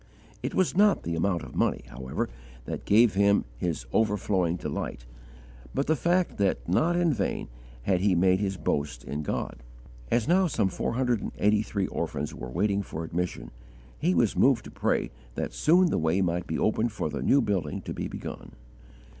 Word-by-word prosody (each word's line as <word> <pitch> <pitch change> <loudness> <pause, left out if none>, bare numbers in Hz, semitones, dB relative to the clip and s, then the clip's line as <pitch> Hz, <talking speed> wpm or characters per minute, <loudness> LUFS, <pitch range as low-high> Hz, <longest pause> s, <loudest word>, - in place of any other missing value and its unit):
It - - -3
was 185 -2 +2
not 205 +1 +4
the 85 - -2
amount 85 +1 0
of - - -10
money, - - 0
however, 65 +1 -3 0.4
that - - -5
gave 110 +1 +5
him 100 +1 +3
his 85 -8 -2
overflowing 100 -5 +1
delight, - - -4 0.7
but 140 - +1
the 160 - +2
fact 175 - +1
that 100 -2 +1
not 160 - +2
in 175 -3 +3
vain 120 - -2 0.3
had 90 +4 +2
he 95 0 +3
made 95 +2 +4
his 95 -2 -1
boast 75 -3 -2
in 75 +2 -4
God. 75 - -3 0.5
As 120 -1 +1
now 185 +2 +4
some 110 - +1
four 95 - -2
hundred 125 -3 +1
and - - -4
eighty 105 0 +3
three 100 -3 -2
orphans 75 -4 -3
were 65 - -7
waiting 100 +9 +1
for 80 -4 -6
admission, 85 -7 -3 0.5
he 90 - +2
was 80 - +2
moved - - +4
to - - -10
pray - - 0 0.2
that - - -3
soon 175 +2 +4
the - - +1
way 80 +3 +1
might 90 -2 0
be 80 - -2
opened 110 +2 +1
for 105 - -2
the 75 -2 -4
new 140 - +4
building 95 - -1
to - - -5
be - - -3
begun. - - -8
100 Hz, 190 wpm, -27 LUFS, 85-120 Hz, 0.7 s, gave